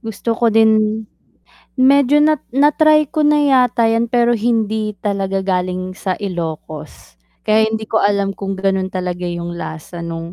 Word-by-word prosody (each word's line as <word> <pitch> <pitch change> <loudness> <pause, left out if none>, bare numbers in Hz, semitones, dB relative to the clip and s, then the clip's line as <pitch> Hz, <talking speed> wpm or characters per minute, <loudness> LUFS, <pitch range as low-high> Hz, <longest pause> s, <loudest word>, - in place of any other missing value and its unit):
Gusto 225 0 -4
ko 230 +1 +1
din 220 0 +2 0.7
medyo 280 +2 +4
nat 305 -2 +2
na-try 305 +1 +3
ko 310 - -2
na 295 0 +3
yata 250 -4 +3
'yan, 230 +1 +1
pero 240 0 +2
hindi 220 -2 -1
talaga 195 -2 -2
galing 185 0 -2
sa 190 0 -3
Ilocos, 160 - -7 0.3
kaya 220 +1 +3
hindi 220 0 -4
ko 220 0 0
alam 200 -1 +1
kung 195 0 -5
gano'n 190 -1 -1
talaga 180 -1 -4
'yung 175 0 -5
lasa 160 +2 -8
nung 165 0 -6
215 Hz, 150 wpm, -17 LUFS, 185-240 Hz, 0.7 s, medyo